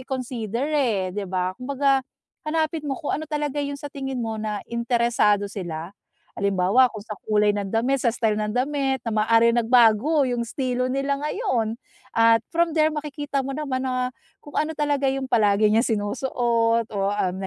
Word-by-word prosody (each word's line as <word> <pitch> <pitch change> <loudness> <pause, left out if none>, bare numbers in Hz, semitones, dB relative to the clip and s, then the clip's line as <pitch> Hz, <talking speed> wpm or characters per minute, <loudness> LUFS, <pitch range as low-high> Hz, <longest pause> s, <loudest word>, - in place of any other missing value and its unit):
i-consider, 250 -2 -3
eh, 220 -11 +1
'di 200 -2 -4
ba, 185 0 -1
kumbaga, 275 +1 +1 0.5
hanapin 315 -1 -1
mo 270 - -1
kung 295 - -3
ano 310 0 -3
talaga 295 -1 -2
'yong 285 0 -3
sa 285 0 -9
tingin 270 -2 -4
mo 220 -1 -3
na 210 -1 -4
interesado 235 -3 +2
sila. 175 -3 -6 0.4
Halimbawa, 200 +6 +3
kung 215 -3 -9
sa 215 - -7 0.2
kulay 210 -1 +3
ng 205 -1 -3
damit, 245 +6 +1
sa 235 - +2
style 220 -2 0
ng 210 0 -2
damit, 270 -1 0
na 230 - -2
maaaring 230 +2 +4
nagbago 245 +5 +4
'yong 245 -2 -1
istilo 255 -1 -1
nila 275 +1 -1
ngayon. 260 - -1 0.4
At 230 -1 +5
from 335 0 +1
there 310 -1 +3
makikita 290 -2 -3
mo 275 - -4
naman 270 -3 -3
na, 255 -1 0 0.3
kung 290 - -11
ano 310 +1 0
talaga 290 -2 -1
'yong 270 0 0
palagi 210 -3 +3
niyang 225 +4 +3
sinusuot 230 +1 0
o, 205 - -5
um, 185 -3 -1
na - - -2
245 Hz, 175 wpm, -24 LUFS, 215-280 Hz, 0.5 s, At